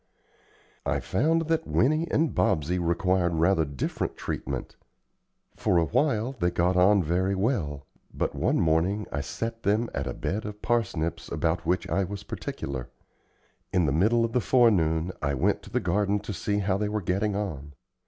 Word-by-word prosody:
I - - 0
found 160 - +1
that 160 0 -1
Winnie 155 +6 +2
and 155 0 +1
Bobsey 90 0 +1
required 85 0 +1
rather 80 +1 +3
different 70 -3 -3
treatment. - - -4 0.8
For 90 - +1
a 85 - +4
while 120 - +1
they 90 - +2
got 90 +1 +1
on 95 +2 +5
very 90 +5 +1
well, 90 - -1 0.3
but - - -2
one - - +1
morning 85 +6 +1
I 70 - -2
set 115 +10 -4
them 110 +3 +1
at 70 0 -2
a - - -4
bed 105 +3 -2
of 105 0 -8
parsnips 85 -9 -1
about 80 0 -1
which 90 +2 +1
I 100 - +1
was 100 +1 -6
particular. 65 -3 -5 0.8
In 90 -3 +2
the 70 - +1
middle 110 +10 +3
of 115 - -4
the 125 - +2
forenoon 90 -9 +3
I 70 -1 0
went 65 - +1
to - - -13
the - - 0
garden 100 0 +1
to 105 0 -5
see 100 +3 -1
how 100 -1 0
they 105 -1 0
were 105 -1 -2
getting 100 +3 0
on. 75 -9 -4
95 Hz, 175 wpm, -27 LUFS, 80-105 Hz, 0.8 s, on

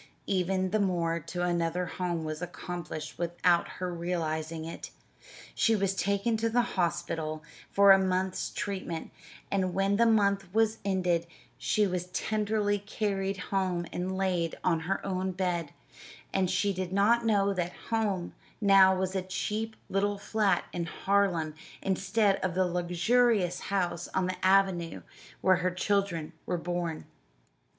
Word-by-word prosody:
Even 185 -1 0
the 215 - +2
move 170 -4 0
to 175 -1 -3
another 175 0 0
home 175 -2 -3
was 155 +1 -4
accomplished 175 -3 -6
without 175 0 +2
her 180 -1 -3
realizing 160 -2 -2
it 165 - -7 0.6
she 225 - +3
was 195 -2 +1
taken 200 +3 0
to 230 +1 0
the 240 +2 +3
hospital 165 -3 -1 0.3
for 200 0 +6
a 195 - +8
month's 185 0 0
treatment, 185 -5 -4 0.4
and 185 -2 0
when 195 +1 +2
the 235 +1 +5
month 200 -4 +2
was 225 0 +2
ended 180 -3 +1 0.3
she 210 - +1
was 180 -2 -2
tenderly 210 +1 0
carried 195 -1 -2 0.2
home 185 -3 0
and 185 +1 -2
laid 180 -4 0
on 170 -3 +2
her 180 +4 -2
own 190 -1 -1
bed; 175 -4 -1 0.6
and 190 -2 +2
she 200 +2 +1
did 185 -1 -4
not 215 +5 +3
know 200 -3 +2
that 180 -2 -2 0.2
"home" 205 -6 0 0.3
now 195 -2 +6
was 185 0 -1
a 190 - +1
cheap 215 +4 -3
little 200 +1 0
flat 200 -3 +1
in 170 -1 -2
Harlem 180 -4 +1 0.3
instead 195 +1 +2
of 185 -2 -2
the 185 0 +3
luxurious 180 +3 +2
house 180 -4 -1
on 190 - +2
the 185 0 -4
avenue 190 -3 +2 0.4
where 185 -1 +5
her 180 +1 +1
children 180 -4 -1
were 180 - 0
born. 175 -2 -3
185 Hz, 145 wpm, -29 LUFS, 175-200 Hz, 0.6 s, a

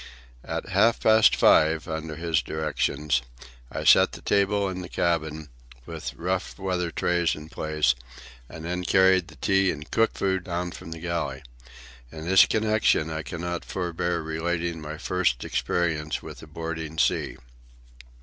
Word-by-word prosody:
At - - -5
half 110 +5 +3
past 110 0 +5
five, 80 +1 +4
under 80 -1 -4
his 80 0 0
directions, 75 -3 -1 0.5
I - - -4
set - - +6
the - - -9
table 100 0 +2
in 95 -1 -4
the 90 - -8
cabin, 80 -3 -1 0.4
with 60 +1 -6
rough 90 +4 -3
weather 90 -3 -1
trays 85 0 0
in 75 +1 -10
place, 75 -6 +1 0.6
and 80 - -9
then 90 +1 -3
carried 95 -1 +4
the - - -14
tea 95 -1 +2
and 75 -2 -5
cooked 115 0 +2
food 95 -1 0
down 90 -1 -3
from 80 - -10
the 80 - -6
galley. 80 -6 -3 0.7
In 80 0 -8
this 95 +1 +7
connection 110 -7 +2
I 80 0 -3
cannot 85 +1 -4
forbear 85 -2 -2
relating 85 +1 -2
my 75 +1 -6
first 90 -8 0
experience 80 -3 -1
with - - -9
a - - -11
boarding 80 0 -5
sea. - - +1
85 Hz, 150 wpm, -26 LUFS, 80-90 Hz, 0.7 s, this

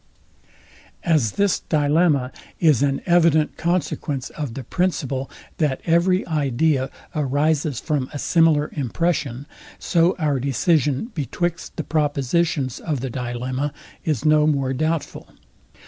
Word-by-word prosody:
As 150 -11 +2
this 200 -3 +2
dilemma 150 -3 +2 0.3
is 155 -8 +4
an 140 -1 +1
evident 165 -3 +3
consequence 155 -5 -2
of 145 -7 -5
the 135 - -5
principle, 140 -4 -1 0.3
that 145 -5 0
every 175 +2 +3
idea 145 -2 +1 0.3
arises 145 -1 0
from 145 -5 -2
a - - -5
similar 160 -1 +3
impression, 140 -1 -1 0.3
so 170 +1 +2
our 150 -5 0
decision 145 - +1
betwixt 170 +3 -3
the 160 - -3
propositions 145 -2 0
of 150 -6 -3
the 130 -1 -4
dilemma 125 +3 -3 0.3
is 150 -3 -1
no 155 0 +5
more 135 -3 +1
doubtful. 155 +3 -2
150 Hz, 115 wpm, -22 LUFS, 135-165 Hz, 0.3 s, no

